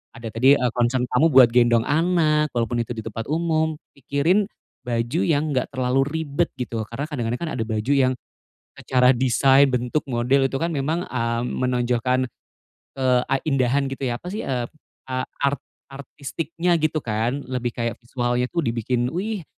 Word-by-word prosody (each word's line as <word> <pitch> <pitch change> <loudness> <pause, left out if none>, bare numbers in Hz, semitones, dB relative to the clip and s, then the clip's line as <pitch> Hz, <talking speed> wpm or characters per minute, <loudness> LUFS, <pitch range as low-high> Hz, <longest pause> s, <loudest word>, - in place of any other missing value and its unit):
Ada 115 -2 -7
tadi, 130 +5 +5
e 125 - -1
concern 125 +1 +1
kamu 150 +6 +4
buat 130 -5 +6
gendong 120 -1 +4
anak, 155 0 +2
walaupun 120 0 0
itu 115 0 -3
di 110 - -6
tempat 115 0 -6
umum. 160 0 0 0.2
Pikirin 145 +9 +1 0.4
baju 120 +6 -1
yang 155 -1 +1
nggak 130 -2 0
terlalu 130 +1 +1 0.2
ribet 150 +4 0
gitu, 120 -2 -4
karena 140 +5 -4
kadang-kadang 120 -4 -2
kan - - -4
ada - - +1
baju 110 +4 -1
yang, 130 -2 +3 0.6
secara 125 0 +3
desain, 135 +2 +4
bentuk 125 +4 -1
model 130 +2 +2
itu 135 - -3
kan 165 - 0
memang, 155 +4 -2
ah, 115 -1 -1
menonjolkan, 125 0 0 0.7
ke 135 - -3 0.2
a 135 - +1
indahan 135 -1 +1
gitu 135 0 -3
ya, 120 - -1
apa - - -13
sih, 215 - -3
eee, 125 -3 -1 0.4
a 130 0 -1 0.2
ar 140 0 +3 0.4
artistiknya 155 +5 -3
gitu 155 0 +1
kan, 120 +5 -1
lebih 125 -2 -2
kayak 115 0 -3
visualnya 120 +1 -1
tuh 170 -3 -2
dibikin, 120 +1 -1
wih, 195 +1 -3
130 Hz, 165 wpm, -23 LUFS, 120-145 Hz, 0.7 s, buat